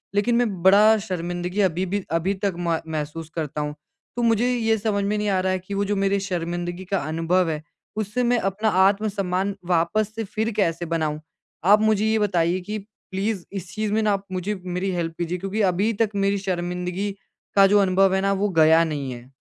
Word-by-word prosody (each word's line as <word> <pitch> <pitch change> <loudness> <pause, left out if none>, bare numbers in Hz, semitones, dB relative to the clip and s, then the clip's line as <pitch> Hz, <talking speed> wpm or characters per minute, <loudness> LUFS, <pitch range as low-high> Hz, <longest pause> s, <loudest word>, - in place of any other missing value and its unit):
लेकिन 210 +4 +2
मैं 220 -7 0
बड़ा 210 +3 +6
शर्मिंदगी 175 +2 -2
अभी 185 -1 +1
भी 200 +2 -2
अभी 165 +4 +1
तक 200 -2 +1
म 170 -2 0
महसूस 155 0 -4
करता 150 -2 -3
हूँ। 150 0 -3 0.4
तो 240 - -1
मुझे 235 +2 +2
ये 225 -2 +1
समझ 205 -1 -1
में 210 +1 0
नहीं 210 0 0
आ 190 -2 +2
रहा 185 0 0
है 185 - 0
कि 185 +3 -8
वो 200 0 0
जो 205 +1 0
मेरे 195 0 +1
शर्मिंदगी 175 -1 -3
का 195 - +2
अनुभव 165 +3 +1
है 155 -1 -3 0.4
उससे 215 +4 -1
मैं 245 0 +3
अपना 200 +3 0 0.2
आत्म-सम्मान 195 -2 -1
वापस 185 +5 +1
से 225 - -2
फ़िर 220 +2 -2
कैसे 170 -4 +1
बनाऊँ? 160 -2 -1 0.5
आप 210 +3 +6
मुझे 215 -1 +2
ये 220 0 +2
बताइए 180 -3 +1
कि 210 +4 -4 0.3
प्लीज़ 195 0 -2
इस 190 -2 -6
चीज़ 215 -1 -2
में 220 - +2
ना 215 -1 +2
आप 195 0 -3
मुझे 185 +3 -2
मेरी 180 +2 -2
हेल्प 170 -2 -2
कीजिए 175 +1 -2
क्योंकि 195 +4 -3
अभी 200 +6 +1
तक 220 - +3
मेरी 200 0 +1
शर्मिंदगी 180 +1 -2 0.4
का 195 -1 +7
जो 205 +1 +4
अनुभव 190 0 +3
है 190 - +1
ना 195 0 +1
वो 200 +1 0
गया 160 +1 +6
नहीं 145 -5 -3
है। 120 0 -10
195 Hz, 205 wpm, -23 LUFS, 175-210 Hz, 0.5 s, का